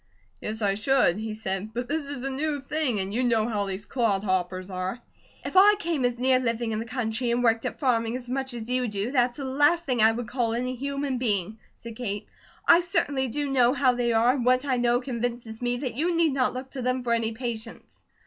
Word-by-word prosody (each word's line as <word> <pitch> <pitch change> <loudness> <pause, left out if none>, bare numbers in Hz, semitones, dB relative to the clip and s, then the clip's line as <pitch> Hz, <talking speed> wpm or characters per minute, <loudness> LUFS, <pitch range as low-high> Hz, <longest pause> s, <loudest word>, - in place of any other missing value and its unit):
"Yes, 220 +1 -4
I 200 -1 +3
should!" 215 -3 +2
he 220 0 -4
said. 210 0 -4
"But 245 +1 -2
this 300 +1 -2
is 280 -3 -5
a 270 - -1
new 290 +2 -1
thing, 275 -5 0
and 190 +1 -3
you 250 +3 0
know 230 -3 +2
how 210 -3 -1
these 195 +2 -4
clodhoppers 190 -5 -1
are." 185 +5 -3 0.5
"If - - -5
I 405 +3 +8
came 330 -9 -1
as 245 -1 0
near 255 +1 +3
living 230 -2 -1
in 215 - -1
the 225 - -4
country, 235 0 -2
and 240 +1 +1
worked 225 -1 +2
at - - -6
farming 235 -3 +1
as 250 -1 -11
much 265 0 -3
as 225 -1 -6
you 250 0 0
do, 210 +2 -2
that's 245 -3 +1
the 280 - -4
last 290 +6 +2
thing 250 -4 +1
I 220 +1 +6
would 235 +1 -4
call 240 -2 -1
any 250 +2 -2
human 275 0 -3
being," 215 -3 -1 0.2
said 230 -1 -10
Kate. 205 -4 -3 0.4
"I 335 - +8
certainly 340 -7 0
do 290 +5 -2
know 250 -2 +4
how 260 -2 +3
they 245 -1 0
are, 230 +2 +4
and 260 -2 -1
what 255 +2 +3
I 260 -3 +1
know 240 0 +2
convinces 240 -3 -4
me 245 0 0
that 255 -2 -3
you 335 +7 0
need 330 -3 +3
not 255 -2 +1
look 260 +1 -6
to 265 - -5
them 255 +1 -1
for 235 -1 +1
any 230 -1 0
patients." 230 -2 -7
245 Hz, 235 wpm, -26 LUFS, 225-265 Hz, 0.5 s, I